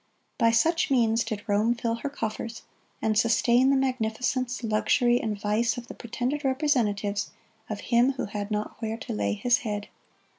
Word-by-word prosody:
By 230 Hz, -2 st, +5 dB
such 320 Hz, +9 st, +2 dB
means 230 Hz, -3 st, +3 dB
did 215 Hz, -3 st, -5 dB
Rome 215 Hz, +3 st, +2 dB
fill 230 Hz, -1 st, -2 dB
her 280 Hz, -, -4 dB
coffers, 230 Hz, -3 st, -5 dB, 0.4 s
and 220 Hz, -1 st, +2 dB
sustain 235 Hz, +3 st, +4 dB
the 275 Hz, -, +4 dB
magnificence, 255 Hz, 0 st, -1 dB
luxury, 240 Hz, +3 st, +2 dB
and 210 Hz, -2 st, -3 dB
vice 215 Hz, +3 st, +1 dB
of 245 Hz, -, -6 dB
the -, -, -6 dB
pretended 255 Hz, +5 st, -3 dB
representatives 230 Hz, -8 st, 0 dB, 0.4 s
of 215 Hz, -2 st, -4 dB
Him 245 Hz, +3 st, +3 dB
who 260 Hz, -, -3 dB
had 205 Hz, 0 st, -5 dB
not 210 Hz, 0 st, -3 dB
where 225 Hz, 0 st, -2 dB
to -, -, -6 dB
lay 100 Hz, -1 st, 0 dB
His 245 Hz, -, +2 dB
head. 210 Hz, -3 st, -4 dB
230 Hz, 170 wpm, -27 LUFS, 215-250 Hz, 0.4 s, By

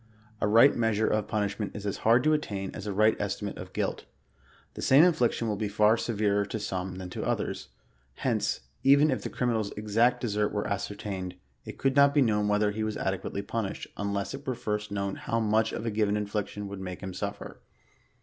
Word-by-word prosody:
A -, -, +2 dB
right 115 Hz, +6 st, +6 dB
measure 110 Hz, -2 st, +1 dB
of 105 Hz, -1 st, 0 dB
punishment 105 Hz, -1 st, -2 dB
is 105 Hz, -1 st, -6 dB
as 100 Hz, -, -2 dB
hard 120 Hz, +2 st, +4 dB
to 155 Hz, -, +4 dB
attain 100 Hz, -10 st, -2 dB
as 105 Hz, 0 st, -7 dB
a -, -, -1 dB
right 110 Hz, +3 st, +4 dB
estimate -, -, -3 dB
of -, -, -8 dB
guilt. -, -, -2 dB, 0.7 s
The -, -, -7 dB
same 135 Hz, +4 st, +6 dB
infliction 125 Hz, -9 st, +2 dB
will 105 Hz, -2 st, -1 dB
be 105 Hz, 0 st, -1 dB
far 105 Hz, +2 st, +4 dB
severer 105 Hz, -3 st, 0 dB
to 105 Hz, +2 st, -4 dB
some 95 Hz, -2 st, -3 dB
than 90 Hz, -1 st, -7 dB
tp -, -, -4 dB
others; -, -, -2 dB, 0.5 s
hence, -, -, -1 dB, 0.2 s
even 140 Hz, +2 st, +5 dB
if 130 Hz, -, -1 dB
the -, -, -4 dB
criminal's 115 Hz, -4 st, -1 dB
exact 110 Hz, +4 st, +2 dB
desert 105 Hz, -3 st, 0 dB
were 105 Hz, -, -1 dB
ascertained, 100 Hz, -2 st, -4 dB, 0.3 s
it -, -, -8 dB
could 135 Hz, 0 st, +1 dB
not 140 Hz, 0 st, +5 dB
be 145 Hz, -, +6 dB
known 105 Hz, -3 st, +1 dB
whether 105 Hz, 0 st, +2 dB
he 110 Hz, +1 st, -3 dB
was 110 Hz, -1 st, -2 dB
adequately 95 Hz, +1 st, -2 dB
punished, 105 Hz, -1 st, -3 dB
4liless 100 Hz, -1 st, -2 dB
it 140 Hz, -, -8 dB
were 130 Hz, -, 0 dB
first 105 Hz, -3 st, -3 dB
known 100 Hz, -1 st, -2 dB
how 115 Hz, -, -1 dB
much 110 Hz, 0 st, +2 dB
a 115 Hz, 0 st, -3 dB
given 105 Hz, -1 st, +1 dB
infliction 105 Hz, 0 st, -3 dB
would 100 Hz, -1 st, -7 dB
make 90 Hz, -1 st, -6 dB
him 95 Hz, -, -5 dB
sufler. -, -, -5 dB
105 Hz, 200 wpm, -28 LUFS, 100-115 Hz, 0.7 s, right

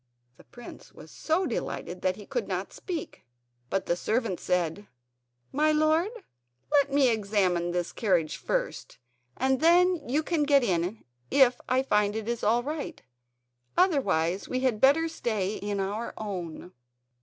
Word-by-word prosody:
The -, -, -18 dB
prince 240 Hz, -1 st, -12 dB
was -, -, -14 dB
so 330 Hz, +4 st, 0 dB
delighted 180 Hz, +1 st, -4 dB
that 185 Hz, 0 st, +1 dB
he 205 Hz, -, -11 dB
could -, -, -3 dB
not -, -, -3 dB
speak. 340 Hz, -5 st, -6 dB, 0.5 s
But 195 Hz, -, -1 dB
the 170 Hz, -, +1 dB
servant 215 Hz, -1 st, -1 dB
said: 180 Hz, +2 st, -1 dB, 0.6 s
"My 305 Hz, +3 st, +2 dB
lord, 310 Hz, +4 st, +3 dB, 0.6 s
let 285 Hz, -1 st, +3 dB
me 275 Hz, -2 st, +4 dB
examine 195 Hz, -6 st, +1 dB
this 175 Hz, 0 st, -2 dB
carriage 180 Hz, -8 st, 0 dB
first -, -, -3 dB, 0.4 s
and 265 Hz, 0 st, +1 dB
then 345 Hz, -2 st, +4 dB
you 295 Hz, +5 st, +1 dB
can 330 Hz, -1 st, 0 dB
get 285 Hz, -2 st, +4 dB
in 180 Hz, +1 st, -1 dB, 0.3 s
if 250 Hz, -3 st, +4 dB
I 255 Hz, +1 st, +2 dB
find 210 Hz, -5 st, +1 dB
it 220 Hz, -1 st, -4 dB
is 235 Hz, -1 st, -2 dB
all 235 Hz, +3 st, +3 dB
right; 300 Hz, +2 st, -5 dB, 0.8 s
otherwise 200 Hz, -, +2 dB
we 255 Hz, -, -1 dB
had 250 Hz, -5 st, 0 dB
better 290 Hz, +5 st, +5 dB
stay 215 Hz, -, -2 dB
in 205 Hz, 0 st, -3 dB
our 205 Hz, +4 st, -3 dB
own." 180 Hz, -5 st, -6 dB
230 Hz, 150 wpm, -28 LUFS, 195-290 Hz, 0.8 s, better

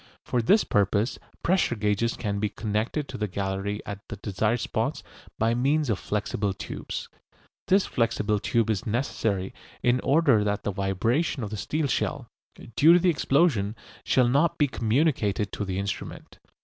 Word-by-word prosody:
For 125 Hz, -, 0 dB
this 200 Hz, -, +4 dB
purpose 105 Hz, +4 st, +1 dB, 0.2 s
pressure 175 Hz, -8 st, +2 dB
gauges 105 Hz, +2 st, 0 dB
can 100 Hz, -3 st, -2 dB
be 105 Hz, 0 st, 0 dB
connected 110 Hz, +8 st, -2 dB
to -, -, -7 dB
the 105 Hz, -, 0 dB
gallery 100 Hz, +2 st, -3 dB
at 100 Hz, -1 st, -5 dB
the -, -, -6 dB
desired 105 Hz, +4 st, -1 dB
spots -, -, -2 dB, 0.3 s
by 115 Hz, +1 st, +2 dB
means 140 Hz, +2 st, +1 dB
of 100 Hz, -, -1 dB
flexible 105 Hz, -1 st, -2 dB
tubes. -, -, -6 dB, 0.6 s
This 195 Hz, +1 st, +4 dB
flexible 115 Hz, -3 st, 0 dB
tube 115 Hz, +1 st, +1 dB
is 100 Hz, -1 st, -3 dB
necessary 105 Hz, -5 st, -1 dB, 0.3 s
in 125 Hz, +1 st, +3 dB
order 135 Hz, -6 st, +3 dB
that 105 Hz, -1 st, -1 dB
the 105 Hz, -, -1 dB
vibration 110 Hz, -, 0 dB
of 105 Hz, -, -5 dB
the -, -, -3 dB
steel 150 Hz, +9 st, -1 dB
shell, 135 Hz, -, -1 dB, 0.5 s
due 160 Hz, +3 st, +7 dB
to 175 Hz, -, +6 dB
the 180 Hz, 0 st, +3 dB
explosion, 135 Hz, -, +2 dB, 0.3 s
shall 125 Hz, -2 st, +3 dB
not 140 Hz, +6 st, +2 dB
be 145 Hz, -, +3 dB
communicated 115 Hz, -, 0 dB
to 105 Hz, -, -3 dB
the 95 Hz, -1 st, -3 dB
instrument. 100 Hz, +1 st, -5 dB
110 Hz, 160 wpm, -26 LUFS, 100-135 Hz, 0.6 s, due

